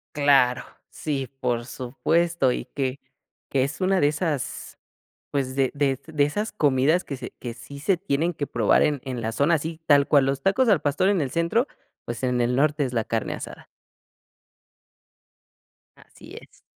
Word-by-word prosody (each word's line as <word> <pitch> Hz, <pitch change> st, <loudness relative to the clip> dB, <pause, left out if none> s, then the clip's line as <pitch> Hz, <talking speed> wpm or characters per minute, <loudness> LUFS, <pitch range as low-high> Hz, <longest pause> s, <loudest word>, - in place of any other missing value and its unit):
Claro, 135 Hz, -4 st, +4 dB, 0.3 s
sí, 140 Hz, -4 st, -3 dB
por 120 Hz, -3 st, -1 dB
supuesto. 140 Hz, +4 st, 0 dB
Y -, -, -3 dB
que, 135 Hz, -1 st, -2 dB, 0.5 s
que 135 Hz, -2 st, +2 dB
es 140 Hz, +7 st, -4 dB
una 190 Hz, 0 st, +2 dB
de 145 Hz, -, +4 dB
esas 150 Hz, -3 st, -3 dB, 0.5 s
pues, 135 Hz, -2 st, -2 dB
de 135 Hz, -2 st, +1 dB
de 140 Hz, -2 st, 0 dB
de 155 Hz, -3 st, +1 dB
esas 210 Hz, +9 st, -2 dB
comidas 150 Hz, 0 st, +2 dB
que 140 Hz, -, -6 dB
se -, -, -8 dB
que 120 Hz, -2 st, -6 dB
sí 140 Hz, +4 st, -11 dB
se 180 Hz, +4 st, +1 dB
tienen 170 Hz, -1 st, -1 dB
que 145 Hz, -, -3 dB
probar -, -, +3 dB
en 145 Hz, -3 st, 0 dB
en 125 Hz, -3 st, -4 dB
la 110 Hz, +1 st, -2 dB
zona. 145 Hz, +8 st, +2 dB
Así 160 Hz, +2 st, -4 dB
tal 145 Hz, -2 st, +5 dB
cual 140 Hz, -3 st, +4 dB
los 135 Hz, 0 st, -1 dB
tacos 230 Hz, +5 st, +3 dB
al 190 Hz, -7 st, +4 dB
pastor 145 Hz, +7 st, +1 dB
en 200 Hz, -4 st, +2 dB
el 135 Hz, -2 st, -2 dB
centro, 170 Hz, -, +1 dB, 0.4 s
pues, 120 Hz, +1 st, -5 dB
en 125 Hz, -1 st, +1 dB
el 120 Hz, +1 st, +1 dB
norte 145 Hz, +1 st, +2 dB
es 125 Hz, -, -5 dB
la 115 Hz, -2 st, 0 dB
carne 115 Hz, -1 st, -2 dB
asada. -, -, -9 dB, 2.3 s
Así -, -, -16 dB
es. -, -, -21 dB
140 Hz, 175 wpm, -24 LUFS, 130-165 Hz, 2.3 s, tal